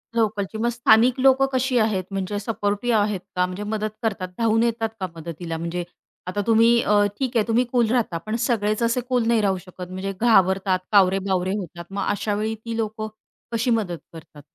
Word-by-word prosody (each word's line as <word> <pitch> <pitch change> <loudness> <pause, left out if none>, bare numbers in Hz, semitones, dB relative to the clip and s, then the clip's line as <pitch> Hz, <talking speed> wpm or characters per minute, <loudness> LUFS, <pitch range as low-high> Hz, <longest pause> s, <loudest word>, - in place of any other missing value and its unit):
लोकलची. 215 -2 0
मग 235 +2 +1
स्थानिक 240 +1 +4
लोकं 270 +1 +5
कशी 260 0 +1
आहेत, 215 -4 +1
म्हणजे 195 +1 -2
सपोर्टिव्ह 205 +2 0
आहेत 205 -2 0 0.2
का? 180 0 +2
म्हणजे 185 +3 -5
मदत 215 0 -2
करतात, 195 -5 -1
धावून 225 0 +2
येतात 230 -1 0
का 185 - -2
मदतीला? 165 0 -6
म्हणजे 170 +2 -3 0.4
आता 195 +3 -2
तुम्ही 230 +1 +5
अ, 205 0 +3
ठीक 260 -2 -2
आहे, 215 - +1
तुम्ही 235 +2 +3
कूल 240 -3 +2
राहता, 230 -9 0
पण 215 +6 -4
सगळेच 215 -3 0
असे 235 +2 +1
कूल 250 -3 +2
नाही 230 -1 +3
राहू 195 -2 +1
शकत. 180 0 -10
म्हणजे 190 +2 -4
घाबरतात, 190 -4 +3
कावरे 195 -2 +5
बावरे 185 -1 0
होतात. 175 -3 -7
मग 200 0 -2
अशावेळी 210 +1 -1
ती 230 -1 -3
लोकं 215 -1 -3 0.4
कशी 230 +2 0
मदत 205 -7 0 0.2
करतात? 155 -2 -12
210 Hz, 185 wpm, -23 LUFS, 190-230 Hz, 0.4 s, लोकं